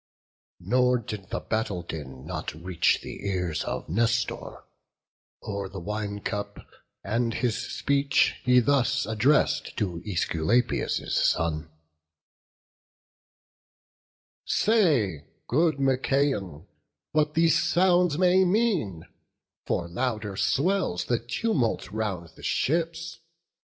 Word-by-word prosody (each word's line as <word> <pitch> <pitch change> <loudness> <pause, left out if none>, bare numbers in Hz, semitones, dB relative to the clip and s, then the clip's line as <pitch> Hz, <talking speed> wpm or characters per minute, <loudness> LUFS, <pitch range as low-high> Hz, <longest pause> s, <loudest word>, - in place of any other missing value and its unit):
BOOK - - -17
XIV. - - -15
Nor 125 0 +3
did 105 -5 -7
the - - -2
battle 105 -5 -2
din 65 -6 -8
not - - -5
reach 85 +2 +1
the - - -8
ears 90 -5 -1
Of - - -4
Nestor, 115 +5 -1 0.8
o'er 100 -2 -4
the 95 0 -7
wine 105 +2 -4
cup; 100 -1 -5 0.4
and 115 +1 -1
his 120 -3 0 0.2
speech 140 -1 +1
He 125 0 +5
thus 140 +1 +2
address'd 135 +6 +1
to 90 -6 -2
Æsculapius' 105 +4 0
son: 80 -1 +1 2.7
"Say, 140 - +2 0.2
good 155 +2 +2
Machaon, 135 - 0 0.5
what 150 0 +1
these 165 0 +4
sounds 180 -3 +3
may 185 +1 +5
mean; 180 - +1 0.6
For 85 - -1
louder 105 +1 -2
swells 165 - +1
the 120 -1 +1
tumult 120 - -1
round 95 -6 -3
the - - -15
ships. 165 +2 -1
115 Hz, 105 wpm, -26 LUFS, 95-150 Hz, 2.7 s, He